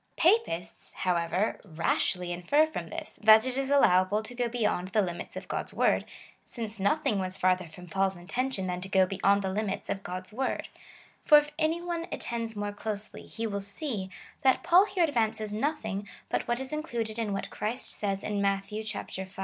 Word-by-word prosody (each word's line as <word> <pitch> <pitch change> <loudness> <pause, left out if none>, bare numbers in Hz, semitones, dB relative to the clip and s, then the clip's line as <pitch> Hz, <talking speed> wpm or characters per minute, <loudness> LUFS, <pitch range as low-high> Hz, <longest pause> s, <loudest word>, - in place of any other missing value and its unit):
^ - - -41
Papists, 330 - +1
how 180 -1 0
ever, 170 +5 0
rashly 175 +1 0
infer 180 - +3
from 315 - -5
this, 325 -1 -6
that 220 +2 +8
it 255 -1 -1
is 270 0 -1
allowable 205 -6 +4
to 230 - -8
go 245 -1 0
beyond 220 -6 0
the 210 +3 +2
limits 175 -2 -5
of - - -7
God's - - -4
word, - - +3 0.4
since 225 -3 -7
nothing 205 +1 +2
was 185 0 -3
farther 185 -1 +2
from 180 +3 -12
Paul's 190 +2 0
intention 200 +4 -2
than 180 -1 -2
to 190 - -6
go 190 -1 +5
beyond 195 +1 +2
the 190 - -1
limits 205 -1 -2
of 195 - -3
God's 185 +1 -6
Avord: 260 +5 -2 0.5
for 300 - +8
if 295 0 +2
any 325 +2 +1
one 340 -1 -3
attends 230 -1 -3
more 205 0 -3
closely, 210 0 -4
he 230 - -4
will 200 -2 -2
see, 200 -1 -1 0.3
that 265 +1 +3
Paul 350 +3 +6
here 380 -3 +1
advances 220 -7 0
nothing 220 -5 -2 0.2
but - - -1
what 240 +1 0
is 265 +2 -5
included 235 -8 -3
in 220 -3 -1
what 195 - -3
Christ 235 +5 -3
says 195 -2 -2
in 205 -1 -1
Matt 195 0 +1
v. 215 +2 -5
210 Hz, 190 wpm, -29 LUFS, 190-260 Hz, 0.5 s, that